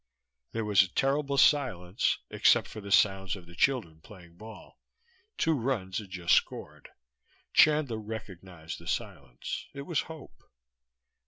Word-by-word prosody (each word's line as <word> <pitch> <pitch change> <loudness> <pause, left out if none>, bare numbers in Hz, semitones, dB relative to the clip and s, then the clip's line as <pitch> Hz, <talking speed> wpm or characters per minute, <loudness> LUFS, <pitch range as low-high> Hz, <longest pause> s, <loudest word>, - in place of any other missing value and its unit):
There 115 -1 -2
was 100 -2 +5
a 95 - +1
terrible 140 +1 0
silence, 115 - +2
except - - +4
for 110 - -9
the 100 0 -8
sounds 95 -2 +3
of 95 -3 -12
the 85 - -15
children 85 -9 0
playing 85 -3 -15
ball. 110 +4 -13 0.6
Two 160 - +2
runs 115 -9 -2
had 105 -3 -10
just 90 -2 0
scored. - - -1 0.6
Chandler 150 -7 +4
recognized 95 -6 -8
the 85 - -13
silence. 80 - -5
It 140 - -6
was 160 -2 -1
hope. 150 - -11
105 Hz, 140 wpm, -29 LUFS, 90-135 Hz, 0.6 s, was